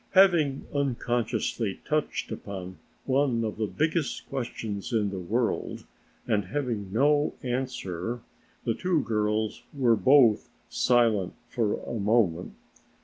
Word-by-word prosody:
Having 170 -8 +4
unconsciously 120 -6 -1
touched 155 0 -1
upon 95 -2 -6 0.3
one 130 -3 +2
of 110 - -4
the 110 -1 0
biggest 155 0 -1
questions 115 -4 -4
in 105 -4 +1
the 95 - -4
world 115 +7 -1 0.4
and 105 -3 +1
having 110 -4 -3
no 145 +6 +3
answer, 120 -4 -3 0.4
the 115 - +1
two 175 +1 0
girls 105 0 0
were 125 -5 +3
both 125 -2 +5 0.2
silent 115 -6 +2 0.2
for 110 -4 0
a - - -6
moment. 100 -5 +1
115 Hz, 115 wpm, -27 LUFS, 105-135 Hz, 0.4 s, both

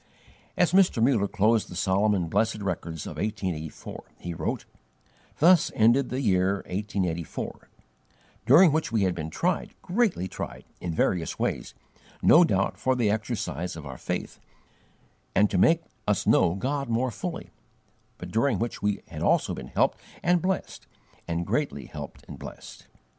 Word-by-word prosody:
As 175 -3 +3
Mr. 185 -9 +4
Muller 115 -4 +3
closed 110 +2 +2
the 90 - -8
solemn 100 +4 +2
and 90 -3 -1
blessed 110 +6 +1
records 85 -4 -4
of - - -7
1884, 95 -8 -4
he 85 - -6
wrote: 80 - -3 0.7
"Thus 170 +1 +5
ended 120 +4 +4
the 130 +2 -2
year 95 -3 +2
1884, 90 -4 -3 0.8
during 160 +7 +8
which 155 -6 0
we 110 -3 +2
had 95 -2 +2
been 80 -2 -5
tried, 175 - -1
greatly 185 - +1
tried, - - -7
in 90 - -3
various 85 0 0
ways, - - -2 0.5
no - - +8
doubt - - 0
for 130 0 +1
the 115 -5 +2
exercise 90 -5 -3
of 80 -2 -8
our 65 -2 -8
faith, - - -4 1.0
and 105 0 +4
to 95 - +1
make 165 - +4 0.2
us - - +1
know 85 - +4
God 140 +5 -2
more 120 +2 +1
fully; - - -6 0.7
but - - -8
during 115 0 +2
which 115 +3 -3
we 105 -1 -1
had - - -8
also - - +2
been - - -7
helped - - +1 0.2
and 175 0 +3
blessed, 190 +2 -3 0.4
and 85 0 -2
greatly 110 - -1
helped 75 -2 -9
and - - -9
blessed. - - -10
105 Hz, 155 wpm, -27 LUFS, 90-130 Hz, 1.0 s, during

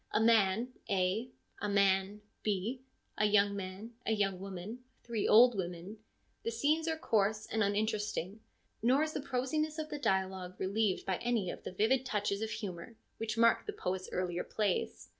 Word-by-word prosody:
A - - +3
man, 225 0 +4 0.2
A; 195 +6 +1 0.3
a 210 - -1
man, 200 0 +2 0.2
B; 215 +5 -1 0.4
a 210 - +4
young 205 -1 +4
man; 195 +4 -6
a 225 - +1
young 195 -3 0
woman; 195 +4 -6 0.2
three 230 -3 -1
old 240 +3 +8
women. 180 +2 -5 0.4
The - - -2
scenes 295 +8 +1
are 320 -1 0
coarse 215 -6 +1
and 220 - -1
uninteresting, 210 -1 -1 0.4
nor 255 +6 +4
is 310 0 -2
the - - -2
prosiness 285 +4 -1
of 310 -1 -4
the 295 - -4
dialogue 190 -5 -1
relieved 200 0 0
by 190 -2 0
any 230 -7 0
of - - -9
the - - -6
vivid 225 +7 +2
touches 205 -4 -1
of 220 - -2
humour 210 0 -6 0.2
which 225 0 -3
mark 230 0 +4
the 420 - -2
poet's 185 - -3
earlier 180 -1 -1
plays. 90 - -2
210 Hz, 170 wpm, -33 LUFS, 190-230 Hz, 0.4 s, old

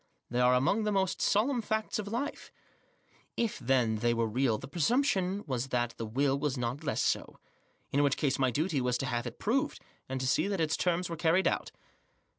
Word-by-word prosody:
They 120 - 0
are 125 0 +5
among 140 - +2
the 210 - 0
most 190 -2 0
solemn 235 +5 +2
facts 220 0 -2
of 205 - -4
life* 240 +7 -4 0.9
If, 230 -2 -1
then, 120 -3 +2
they 120 +2 +1
were 115 0 +1
real, 115 0 +1
the - - -9
presumption 195 - +1
was 130 -2 -2
that 120 -2 -1
the 115 - -4
will 135 +4 +1
was 140 -2 -1
not 125 +5 -3
less 145 - 0
so. - - -1 0.5
In 140 - +2
which 140 -2 +2
case 140 -4 0
my 130 -1 +3
duty 150 +3 0
was 125 0 +1
to - - -3
have 120 -1 -2
it 120 - -8
proved, 255 +6 0 0.3
and 130 0 -2
to 130 - -2
see 155 +7 +2
that 200 -1 -1
to 160 -2 +1
terms 175 +2 0
were 165 - -5
carried 170 +4 +3
out. - - -1
140 Hz, 210 wpm, -30 LUFS, 125-195 Hz, 0.9 s, are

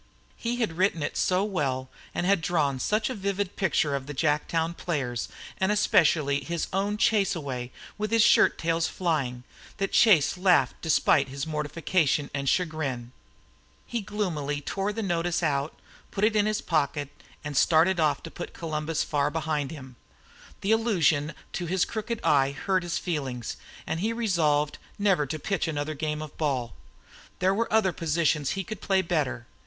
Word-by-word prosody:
He 235 +1 -2
had 220 -9 -2
written 185 -5 +2
it - - -3
so 185 +1 +2
well, 140 -10 -1 0.3
and 175 - 0
had 195 -2 +3
drawn 150 -5 0
such 215 - +1
a 260 - -2
vivid 200 -2 -2
picture 155 -6 +1
of 135 -1 -3
the 145 - -6
Jacktown 160 +3 0
players, 135 -10 -2 0.3
and 190 +2 +2
especially 150 -8 +3
of - - -11
his 170 -1 -1
own 200 +2 0
"chase 205 -3 +2
away" 130 -6 -5 0.3
with 215 0 -1
his 225 0 +4
shirttails 165 -7 +3
flying, 140 -9 -1 0.3
that 195 - -1
Chase 180 -5 +5
laughed 175 -9 +4
despite 160 -3 +3
his 135 +1 -4
mortification 150 -1 0
and 140 -1 -1
chagrin. 145 -9 -1 0.7
He 235 - -3
gloomily 175 -9 -2
tore 195 +7 -2
out 210 - -4
the 225 - -2
notice, 175 -2 0 0.7
put 200 - -3
it 215 0 +3
in 210 0 +3
his 215 0 0
pocket, 145 -3 0 0.3
and 145 -1 -5
started 170 +5 +4
off 155 -2 +1
to 165 - -8
put - - -7
Columbus 155 -1 -2
far 145 -1 0
behind 150 -2 -2
him. 130 -5 -10 0.6
The 200 - 0
allusion 165 -10 +2 0.2
to 175 - -3
his 185 +1 +2
crooked 220 +1 -4
eye 140 -1 +3
hurt 185 +6 0
his 175 -1 -2
feelings, 135 -8 -3 0.3
and 160 - -2
he 220 +5 0
resolved 160 -10 +1 0.2
never 195 -8 +2
to 155 +4 -3
pitch 175 +3 -1
another 150 -1 -2
game 155 0 -3
of 150 - -10
ball. 130 -7 -1 0.6
There 185 +1 +2
were 230 +3 -1
other 210 -4 +3
positions 155 -3 +1
he 195 - -1
could 205 +3 -7
play 190 -1 +2
better. 150 -8 -1
165 Hz, 170 wpm, -27 LUFS, 145-195 Hz, 0.7 s, Chase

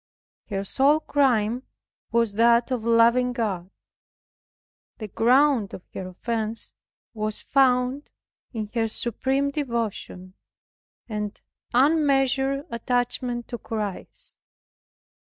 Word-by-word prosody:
Her 195 -2 -2
sole 280 +9 +3
crime 245 -6 +1 0.5
was 230 -3 +2
that 235 +3 +4
of 245 -4 -1
loving 235 +2 +4
God. 195 -7 -2 1.3
The 215 - -6
ground 250 0 +3
of 180 - -11
her 190 - -5
offense 220 +4 -3 0.4
was 215 -1 -2
found 260 +1 +2 0.4
in 215 -3 -5
her 225 -2 +1
supreme 265 +5 -1
devotion 230 -9 -4 0.7
and 210 -2 -4 0.3
unmeasured 275 0 +2
attachment 245 0 -1
to 240 - -5
Christ. 210 -4 -5
235 Hz, 95 wpm, -25 LUFS, 215-265 Hz, 1.3 s, that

